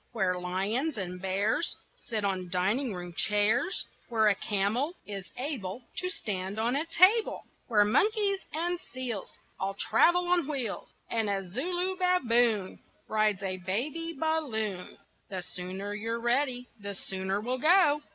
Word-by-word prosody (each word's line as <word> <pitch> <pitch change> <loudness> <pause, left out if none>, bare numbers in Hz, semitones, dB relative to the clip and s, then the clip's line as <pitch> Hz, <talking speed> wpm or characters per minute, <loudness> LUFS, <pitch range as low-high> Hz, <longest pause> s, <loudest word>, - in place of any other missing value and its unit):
Where 190 -5 +1
lions 205 - -1
and 180 -2 -4
bears 200 - +1 0.2
Sit 220 - -3
on 185 -2 -1
dining 200 +9 +1
room 175 -1 -7
chairs, 210 - +2 0.2
Where 220 -2 +4
a - - +5
camel 215 - 0
is 195 -2 -6
able 250 -5 -3
To 365 - -1
stand 195 - -3
on 235 +3 +1
a 305 +4 +1
table, 375 +7 +4 0.2
Where 210 -4 +4
monkeys 395 - +2
and 345 +2 -1
seals 250 - -5 0.3
All 195 +1 -2
travel 350 - +3
on 350 -4 +2
wheels, 265 -8 -3 0.2
And 225 -2 +1
a 195 -2 -1
Zulu 355 - -1
baboon 240 - +2 0.3
Rides 215 -2 +1
a 185 -1 -1
baby 265 - -2
balloon. 220 - -1 0.3
The 185 -2 -4
sooner 185 +3 -5
you're 225 +2 -3
ready, 250 +1 +1
the 200 -1 -4
sooner 190 +1 -2
we'll 250 +4 -2
go. 310 -1 +5
225 Hz, 140 wpm, -29 LUFS, 195-300 Hz, 0.3 s, a